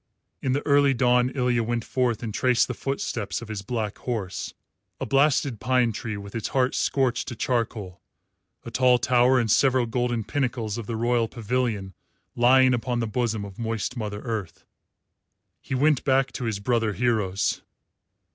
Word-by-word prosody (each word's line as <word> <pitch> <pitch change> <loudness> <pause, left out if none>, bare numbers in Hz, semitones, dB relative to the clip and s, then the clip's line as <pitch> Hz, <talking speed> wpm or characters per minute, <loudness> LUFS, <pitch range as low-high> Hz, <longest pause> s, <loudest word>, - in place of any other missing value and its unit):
In 130 - 0
the 145 - -2
early 140 -2 +4
dawn 125 0 +3
Ilya 125 -2 +1
went 115 0 -2
forth 125 -3 0
and 110 -2 -4
traced 125 +1 +2
the 125 - -3
footsteps 120 -5 -3
of 120 -1 -10
his 105 -2 -4
black 105 0 -3
horse 110 -7 -4 0.4
a - - -2
blasted 135 -3 +2
pine 125 -2 +2
tree 110 0 -5
with 100 0 -9
its 115 - -3
heart 130 -1 +1
scorched 130 -3 0
to 120 - -5
charcoal, 110 -6 -2 0.6
a 115 - -7
tall 125 +1 +4
tower, 125 +1 +3
and 115 -4 0
several 130 -1 +3
golden 120 -1 -1
pinnacles 120 -4 -2
of 110 - -7
the 115 - -3
royal 120 0 +1
pavilion 110 -4 -2 0.4
lying 130 +2 +5
upon 120 0 -1
the 115 - 0
bosom 110 -2 -1
of 100 +1 -11
moist 115 +1 -2
Mother 105 -3 -4
Earth. 110 -7 -5 1.0
He 130 - -4
went 145 +1 +2
back 135 -1 +2
to 125 - -5
his 110 -3 -1
brother 115 0 0
heroes. 105 -5 0
120 Hz, 165 wpm, -25 LUFS, 110-130 Hz, 1.0 s, lying